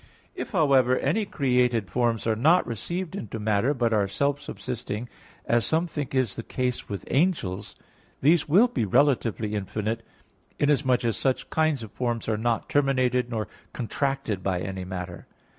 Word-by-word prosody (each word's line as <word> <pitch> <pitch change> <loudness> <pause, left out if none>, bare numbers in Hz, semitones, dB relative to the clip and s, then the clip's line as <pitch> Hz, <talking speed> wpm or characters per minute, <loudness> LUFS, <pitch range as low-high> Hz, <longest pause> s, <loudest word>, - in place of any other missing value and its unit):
If, - - -5
however, 135 - +4
any 215 -1 +1
created 125 - +1
forms 120 -3 +1
are 110 -1 +2
not 160 +11 +4
received 170 - -4
into 115 - -5
matter, 105 +4 +2
but 120 -3 +1
are 105 -2 +2
self 140 +7 0
subsisting, 120 -2 -5 0.4
as 120 -1 +2
some 160 +9 +1
think 145 -5 -4
is 130 -6 +1
the - - -4
case 125 +1 -3
with 100 -4 -5
angels, 140 - 0 0.4
these 155 +2 +3
will 200 +11 +6
be 245 - -1
relatively 115 -2 +2
infinite, 105 +3 -2 0.6
inasmuch 135 -4 +2
as 115 -4 0
such 130 -1 -1
kinds 155 -6 +1
of 110 - -9
forms 120 -2 -2
are 110 - +1
not 115 +1 -1
terminated, 130 -3 +2
nor 110 -3 -2 0.3
contracted 130 -4 -2
by 90 -2 -1
any 95 0 -4
matter. 90 -1 -6
125 Hz, 160 wpm, -26 LUFS, 110-140 Hz, 0.6 s, will